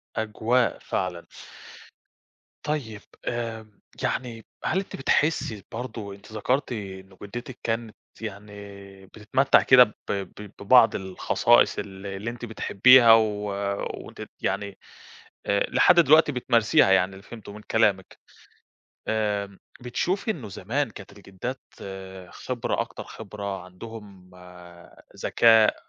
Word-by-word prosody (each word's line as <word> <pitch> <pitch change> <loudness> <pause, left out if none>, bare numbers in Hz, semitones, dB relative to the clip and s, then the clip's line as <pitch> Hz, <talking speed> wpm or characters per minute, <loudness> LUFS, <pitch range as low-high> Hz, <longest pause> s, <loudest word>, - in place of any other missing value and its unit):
أجواء 110 +3 0
فعلًا. 90 -2 -3 1.4
طيب، 125 -9 -3 0.2
آآ 115 -2 -4 0.4
يعني 115 -3 -3 0.2
هل 190 - +1
أنتِ 195 - -6
بتحسّي 135 -7 0
برضه 110 -4 -6
أنتِ 100 +2 -17
ذكرتِ 125 +6 -1
إنه 95 -4 -7
جِدّتِك 120 +5 -8
كانت 115 -1 -3 0.3
يعني 105 -1 -7 0.5
بتتمتّع 110 +7 +2
كده 130 -1 +8
ب 105 -3 -5 0.2
ب 100 +1 -6
ببعض 115 +2 +5
الخصائص 95 -10 +2
ال 95 0 -8
اللي 100 +3 -4
أنتِ 120 +1 -7
بتحبّيها 115 +2 +6
و 115 0 +6 0.8
وأنتِ - - -11
ت - - -8
يعني 100 -1 -2 0.7
آآ 100 - +1
لحد 180 - +5
دلوقتي 155 0 +5
بتمارسيها 115 -6 +3
يعني 95 0 +3
اللي 95 0 -12
فهمته 105 -1 -11
من 105 - -10
كلامِك. 100 -4 +1 0.9
آمم 105 -3 -1 0.2
بتشوفي 185 - -1
إنه 130 - -8
زمان 115 +9 -2
كانت 100 -2 -12
الجِدّات 100 +6 -7 0.7
خبرة 125 -2 -3
أكتر - - -7
خبرة، 100 -3 -7
عندهم 95 0 -12 0.9
ذكاء، 115 -2 +5
110 Hz, 115 wpm, -25 LUFS, 100-120 Hz, 1.4 s, كده